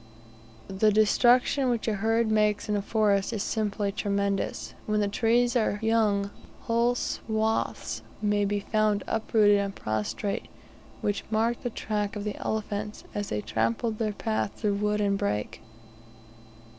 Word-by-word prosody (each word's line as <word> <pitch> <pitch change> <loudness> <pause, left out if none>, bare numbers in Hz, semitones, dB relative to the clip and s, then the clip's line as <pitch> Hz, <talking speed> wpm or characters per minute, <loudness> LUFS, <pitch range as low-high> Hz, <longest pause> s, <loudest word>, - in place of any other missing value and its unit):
The 195 +3 +2
destruction 245 +5 +4
which 235 -2 -1
a 220 - +2
herd 225 +2 +1
makes 210 -1 +2
in 210 - 0
a 205 - 0
forest 205 -1 +1
is 210 - -1
simply 210 -2 -1
tremendous. 200 -1 -1
When 210 0 +1
the 205 - +2
trees 240 +4 +2
are 220 -3 +2
young 210 -3 +1 0.3
whole 240 -1 +2
swathes 220 -2 -2 0.2
may 205 -1 +1
be 205 0 0
found 215 -1 +1
uprooted 215 -2 +3
and 200 -1 -2
prostrate, 110 - -3 0.5
which 205 -1 -1
mark 225 +2 +1
the 245 - -2
track 210 -2 -2
of 205 - -4
the 210 -1 -3
elephants 210 -1 -3
as 205 -1 -3
they 105 - -2
"trampled 115 - -1
their 215 -2 0
path 215 -1 -2
through 205 -2 0
wood 210 0 0
and 200 -1 +1
brake." 105 +1 -2
210 Hz, 145 wpm, -27 LUFS, 200-220 Hz, 0.5 s, destruction